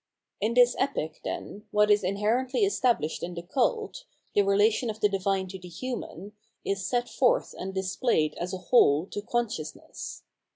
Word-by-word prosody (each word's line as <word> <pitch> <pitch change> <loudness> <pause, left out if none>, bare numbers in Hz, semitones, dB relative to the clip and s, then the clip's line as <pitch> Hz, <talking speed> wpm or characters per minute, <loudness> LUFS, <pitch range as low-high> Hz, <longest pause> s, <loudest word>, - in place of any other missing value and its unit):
In 220 +3 0
this 245 -1 +6
Epic, 160 - -2
then, 210 +2 -6
what 210 0 +3
is 205 0 +4
inherently 220 - 0
established 250 - +1
m 175 0 -4
the 170 - -6
cult, 445 - -1 0.3
the 205 - +5
relation 210 +4 +3
of 215 0 -5
the 210 - +4
divine 195 -1 0
to 190 0 -7
the 180 - -11
human, 205 -1 -6 0.3
is 195 -1 -1
set 245 -1 0
forth - - +2
and 190 - -5
displayed 190 -4 +1
as 175 +1 -3
a 190 - -3
whole 165 - +4
to 205 - -3
consciousness. 205 -9 -4
205 Hz, 165 wpm, -28 LUFS, 185-245 Hz, 0.3 s, this